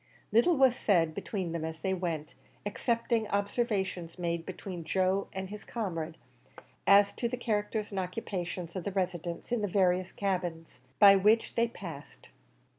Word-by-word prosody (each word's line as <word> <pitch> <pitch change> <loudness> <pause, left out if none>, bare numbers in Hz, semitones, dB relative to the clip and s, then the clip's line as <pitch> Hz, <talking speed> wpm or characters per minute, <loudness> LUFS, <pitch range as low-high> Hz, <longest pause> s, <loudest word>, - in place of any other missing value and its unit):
Little 285 +9 +4
was 265 -2 +5
said 170 -9 +2
between 185 0 -3
them 165 -1 -3
as 160 0 -5
they 190 - 0
went, 170 -5 -3 0.3
excepting 230 +1 0
observations 200 -5 -1
made 170 -2 -2
between 185 -2 -6
Joe 190 +4 +1
and 190 0 -5
his 210 0 -7
comrade, 165 -8 -4 0.7
as 200 +1 +6
to 235 - -2
the 250 - -3
characters 215 -2 -1
and 195 - -2
occupations 180 -2 -4
of 185 - -3
the 200 - -2
residents 175 0 -3
in 240 -3 +1
the 205 - 0
various 185 -1 +2
cabins 175 -7 -3 0.2
by 200 +4 +9
which 210 +4 +3
they 235 0 +2
passed. 170 -10 -10
190 Hz, 155 wpm, -30 LUFS, 175-210 Hz, 0.7 s, by